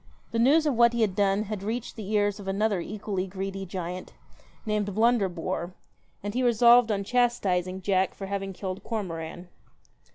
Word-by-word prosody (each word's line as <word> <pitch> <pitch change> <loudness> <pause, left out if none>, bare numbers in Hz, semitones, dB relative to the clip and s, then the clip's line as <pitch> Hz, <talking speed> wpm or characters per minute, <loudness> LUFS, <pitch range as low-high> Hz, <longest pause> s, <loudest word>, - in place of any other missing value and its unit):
The 230 - -1
news 295 +7 +5
of 295 - +2
what 235 0 +5
he 235 - 0
had 200 -4 +1
done 200 +1 +2
had 210 -2 -5
reached 225 +4 -4
the 215 -3 -6
ears 205 -1 +1
of 200 - -9
another 200 0 +1
equally 195 0 -3
greedy 195 +1 -5
giant, 180 0 -5 0.5
named 210 -2 -1
Blunder 225 -3 +3
bore, 175 +1 -4 0.5
and 205 0 -3
he 250 - 0
resolved 240 -1 +6
on 200 -1 0
chastising 195 -6 +1
Jack 190 -1 +1
for 195 - -6
having 195 0 -3
killed 190 0 -5
Cormoran. 175 -5 -5
200 Hz, 170 wpm, -27 LUFS, 190-225 Hz, 0.5 s, resolved